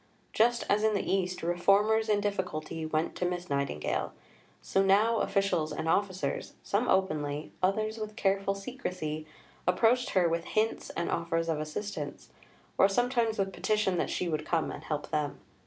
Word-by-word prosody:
Just 235 Hz, +2 st, +3 dB
as 210 Hz, +1 st, +2 dB
in 220 Hz, -1 st, +3 dB
the 200 Hz, -, -1 dB
East, 185 Hz, -2 st, -1 dB
reformers 200 Hz, +6 st, +3 dB
in 205 Hz, -1 st, +3 dB
difficulty 165 Hz, -5 st, -3 dB
"went 155 Hz, +1 st, 0 dB
to -, -, -2 dB
Miss 180 Hz, -2 st, -2 dB
Nightingale," 140 Hz, -, -1 dB, 0.5 s
so 195 Hz, -, +1 dB
now 210 Hz, +4 st, +4 dB
officials 195 Hz, -6 st, +1 dB
and 160 Hz, -, -3 dB
officers 190 Hz, +2 st, 0 dB
some 215 Hz, +5 st, 0 dB
openly, 155 Hz, -5 st, 0 dB
others 215 Hz, +4 st, 0 dB
with 215 Hz, -1 st, -5 dB
careful 195 Hz, 0 st, +1 dB
secrecy 180 Hz, -, -4 dB, 0.4 s
approached 235 Hz, +8 st, +3 dB
her 180 Hz, -2 st, +5 dB
with 165 Hz, 0 st, -1 dB
hints 220 Hz, +1 st, 0 dB
and 170 Hz, -, -1 dB
offers 165 Hz, 0 st, 0 dB
of 160 Hz, -2 st, 0 dB
assistance, 155 Hz, +7 st, -5 dB, 0.5 s
or 195 Hz, -, +7 dB
sometimes 235 Hz, +1 st, +1 dB
with 195 Hz, -1 st, -1 dB
petition 210 Hz, -4 st, +1 dB
that -, -, 0 dB
she 180 Hz, -, -1 dB
would 155 Hz, -2 st, -1 dB
come 165 Hz, 0 st, 0 dB
and -, -, -8 dB
help 150 Hz, -1 st, -3 dB
them. 150 Hz, -2 st, -1 dB
190 Hz, 160 wpm, -30 LUFS, 165-210 Hz, 0.5 s, or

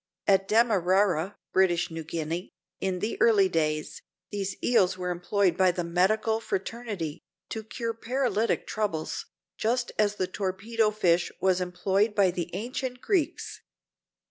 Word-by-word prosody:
At 195 Hz, -1 st, +3 dB
Damarara, 195 Hz, -4 st, +3 dB, 0.2 s
British 180 Hz, -2 st, +3 dB
Guiana, 165 Hz, +1 st, -4 dB, 0.3 s
in 185 Hz, -2 st, -2 dB
the 220 Hz, -, -3 dB
early 210 Hz, -4 st, +5 dB
days, 155 Hz, -3 st, -1 dB, 0.3 s
these 200 Hz, -2 st, -3 dB
eels 190 Hz, -6 st, +3 dB
were 180 Hz, -1 st, -2 dB
employed 180 Hz, +1 st, +1 dB
by 185 Hz, 0 st, +4 dB
the 175 Hz, 0 st, -1 dB
medical 205 Hz, +6 st, +2 dB
fraternity, 195 Hz, -7 st, -4 dB, 0.3 s
to 220 Hz, -, -4 dB
cure 230 Hz, +1 st, -4 dB
paralytic 230 Hz, -2 st, 0 dB
troubles, 200 Hz, -8 st, -3 dB, 0.3 s
just 240 Hz, +2 st, 0 dB
as 210 Hz, -1 st, +3 dB
the 185 Hz, -, 0 dB
torpedo 205 Hz, +4 st, -1 dB
fish 180 Hz, -5 st, +2 dB
was 185 Hz, -1 st, +2 dB
employed 195 Hz, +4 st, 0 dB
by 195 Hz, -3 st, +4 dB
the 175 Hz, -1 st, -4 dB
ancient 250 Hz, +4 st, -4 dB
Greeks. 345 Hz, 0 st, -1 dB
195 Hz, 130 wpm, -27 LUFS, 180-220 Hz, 0.3 s, early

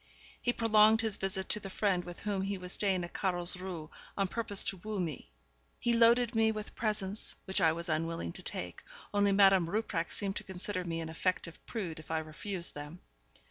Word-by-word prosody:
He 245 Hz, -, +2 dB
prolonged 220 Hz, -1 st, +5 dB
his 220 Hz, -3 st, 0 dB
visit 190 Hz, 0 st, -2 dB
to 210 Hz, -, +3 dB
the 195 Hz, -, -7 dB
friend 190 Hz, -2 st, +1 dB
with 175 Hz, -1 st, -8 dB
whom 205 Hz, -2 st, -1 dB
he 195 Hz, +1 st, -1 dB
was 180 Hz, 0 st, -7 dB
staying 190 Hz, -3 st, +1 dB
at 175 Hz, -, -7 dB
Carlsruhe, 180 Hz, -3 st, -2 dB, 0.3 s
on 195 Hz, -1 st, +2 dB
purpose 210 Hz, -3 st, +2 dB
to 195 Hz, -, -1 dB
woo 210 Hz, +2 st, -4 dB
me. 165 Hz, -5 st, -3 dB, 0.5 s
He 240 Hz, -1 st, +2 dB
loaded 235 Hz, +1 st, +5 dB
me 225 Hz, -1 st, +4 dB
with 215 Hz, -1 st, -6 dB
presents, 210 Hz, -2 st, -2 dB
which 190 Hz, -, +2 dB
I 160 Hz, -, +6 dB
was 170 Hz, +1 st, -4 dB
unwilling 165 Hz, -, -1 dB
to -, -, -3 dB
take, -, -, -4 dB, 0.3 s
only 205 Hz, 0 st, +4 dB
Madame 195 Hz, -3 st, +5 dB
Rupprecht 190 Hz, -4 st, -1 dB
seemed 195 Hz, -1 st, -2 dB
to -, -, -5 dB
consider 190 Hz, 0 st, -3 dB
me 165 Hz, -1 st, -3 dB
an 160 Hz, -, -5 dB
affected 170 Hz, 0 st, -1 dB
prude 180 Hz, -9 st, -4 dB
if 155 Hz, -, -13 dB
I 160 Hz, -, 0 dB
refused 170 Hz, +4 st, -3 dB
them. 150 Hz, +4 st, -8 dB
190 Hz, 195 wpm, -32 LUFS, 170-210 Hz, 0.5 s, I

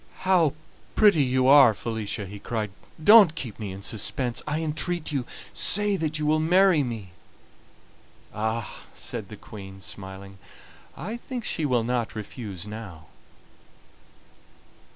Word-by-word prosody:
"How 175 Hz, -6 st, +3 dB, 0.4 s
pretty 205 Hz, -8 st, +5 dB
you 130 Hz, -1 st, +2 dB
are, 135 Hz, -5 st, +7 dB
Felicia!" 110 Hz, -2 st, -4 dB
he 100 Hz, +2 st, -9 dB
cried. 105 Hz, -1 st, -3 dB, 0.3 s
"Don't 205 Hz, -4 st, +8 dB
keep 120 Hz, -9 st, -6 dB
me 105 Hz, -3 st, -5 dB
in 95 Hz, +1 st, -9 dB
suspense, 115 Hz, +4 st, -2 dB
I 150 Hz, +1 st, -1 dB
entreat 160 Hz, +2 st, -2 dB
you; 135 Hz, -4 st, -2 dB, 0.3 s
say 205 Hz, 0 st, +4 dB
that 155 Hz, -3 st, -2 dB
you 155 Hz, -, -2 dB
will 155 Hz, +1 st, +3 dB
marry 180 Hz, +1 st, +4 dB
me." 115 Hz, -8 st, -5 dB, 1.2 s
"Ah!" 110 Hz, +1 st, -3 dB, 0.2 s
said -, -, -4 dB
the -, -, -9 dB
Queen, 95 Hz, -2 st, -11 dB
smiling, 95 Hz, 0 st, -8 dB, 0.6 s
"I 210 Hz, -, -5 dB
think 240 Hz, -1 st, -6 dB
she 155 Hz, -, -1 dB
will 125 Hz, -4 st, +1 dB
not 120 Hz, -2 st, -2 dB
refuse 105 Hz, -3 st, -7 dB
now." 105 Hz, -7 st, -9 dB
125 Hz, 130 wpm, -25 LUFS, 105-155 Hz, 1.2 s, Don't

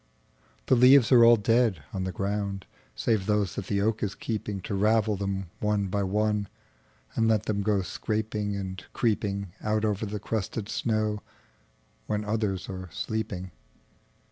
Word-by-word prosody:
The -, -, +3 dB
leaves 125 Hz, 0 st, +7 dB
are 120 Hz, -2 st, +8 dB
all 120 Hz, 0 st, +8 dB
dead 115 Hz, -, +2 dB
on 95 Hz, -2 st, -2 dB
the 95 Hz, -, -2 dB
ground, 100 Hz, 0 st, -2 dB, 0.3 s
Save 105 Hz, -4 st, 0 dB
those 105 Hz, -3 st, +1 dB
that 95 Hz, -, -5 dB
the 100 Hz, -1 st, 0 dB
oak 110 Hz, +1 st, 0 dB
is 100 Hz, -2 st, -2 dB
keepingTo 105 Hz, -4 st, -4 dB
ravel 110 Hz, 0 st, +3 dB
them 95 Hz, -2 st, -3 dB
one 105 Hz, -2 st, 0 dB
by 100 Hz, +2 st, 0 dB
oneAnd 105 Hz, +1 st, 0 dB, 0.7 s
let 110 Hz, -2 st, +3 dB
them 105 Hz, -2 st, -1 dB
go 100 Hz, -1 st, +1 dB
scraping 105 Hz, +1 st, -2 dB
and 95 Hz, -1 st, -5 dB
creepingOut 105 Hz, -1 st, -1 dB
over 105 Hz, 0 st, -1 dB
the 105 Hz, +1 st, -4 dB
crusted 110 Hz, 0 st, -3 dB
snow, 110 Hz, -2 st, 0 dB, 0.9 s
When 105 Hz, 0 st, -1 dB
others 105 Hz, -3 st, -1 dB
are 95 Hz, -1 st, -6 dB
sleeping. 100 Hz, -4 st, -4 dB
105 Hz, 140 wpm, -27 LUFS, 100-110 Hz, 0.9 s, are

